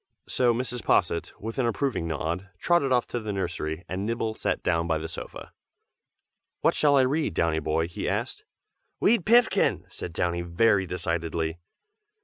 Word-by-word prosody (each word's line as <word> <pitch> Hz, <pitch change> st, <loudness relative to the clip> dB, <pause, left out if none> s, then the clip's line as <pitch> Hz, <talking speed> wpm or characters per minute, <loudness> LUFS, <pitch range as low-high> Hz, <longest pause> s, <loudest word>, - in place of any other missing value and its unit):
So 125 Hz, -2 st, +2 dB
Mrs. 125 Hz, 0 st, -2 dB
Posset, 85 Hz, -2 st, +1 dB
with 115 Hz, +5 st, -5 dB
an 125 Hz, -, +2 dB
approving 115 Hz, -8 st, -1 dB
nod, 85 Hz, +4 st, -3 dB
trotted 160 Hz, -, +2 dB
off 125 Hz, -2 st, +3 dB
to 120 Hz, -, -2 dB
the 110 Hz, -2 st, -4 dB
nursery, 85 Hz, -3 st, -3 dB
and 95 Hz, +2 st, -3 dB
Nibble 115 Hz, 0 st, -1 dB
sat -, -, -2 dB
down 85 Hz, 0 st, +1 dB
by 80 Hz, -1 st, +1 dB
the 80 Hz, +1 st, -5 dB
sofa. -, -, -8 dB, 1.1 s
"What -, -, +4 dB
shall 145 Hz, -2 st, +4 dB
I -, -, +6 dB
read, 140 Hz, -, 0 dB
Downy 80 Hz, -1 st, +1 dB
boy?" 80 Hz, +1 st, 0 dB
he 85 Hz, -, -3 dB
asked. -, -, -3 dB, 0.6 s
"Wead 210 Hz, -4 st, +3 dB
Pinfkin!" 235 Hz, 0 st, +4 dB
said 85 Hz, -, -6 dB
Downy 85 Hz, +1 st, -1 dB
very 95 Hz, +3 st, +2 dB
decidedly. 85 Hz, -2 st, -2 dB
95 Hz, 160 wpm, -26 LUFS, 85-125 Hz, 1.1 s, I